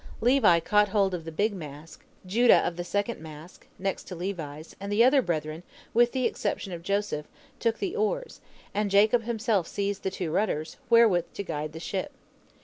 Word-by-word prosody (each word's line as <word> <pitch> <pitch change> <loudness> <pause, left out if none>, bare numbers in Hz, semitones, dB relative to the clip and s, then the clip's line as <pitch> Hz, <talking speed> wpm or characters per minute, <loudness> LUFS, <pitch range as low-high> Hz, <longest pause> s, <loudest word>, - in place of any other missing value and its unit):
Levi 230 -8 +5
caught 210 +4 +3
hold 195 -2 +2
of 170 -3 -4
the 165 - -5
big 205 +7 0
mast, 155 -3 -9 0.3
Judah 230 +6 +5
of 175 - -3
the 175 - -4
second 205 +4 -2
mast, 160 +2 -11
next 195 +1 -3
to 185 - -7
Levi's, 165 -4 -6
and 200 +1 -5
the 215 +3 +5
other 265 +2 +5
brethren, 155 -5 -3 0.3
with 240 +1 +4
the 260 -2 -1
exception 200 -2 -2
of 170 - -6
Joseph, 200 -5 -2 0.3
took 230 -1 +1
the 390 +2 -3
oars, - - -2 0.3
and 210 0 0
Jacob 215 +4 +4
himself 225 -6 0
seized 200 0 -2
the - - -1
two 180 -4 -4
rudders, 160 -5 -1
wherewith 225 -7 +5
to 200 - -3
guide 155 -4 -4
the 160 - -7
ship. 195 - -4
200 Hz, 185 wpm, -27 LUFS, 165-225 Hz, 0.3 s, Levi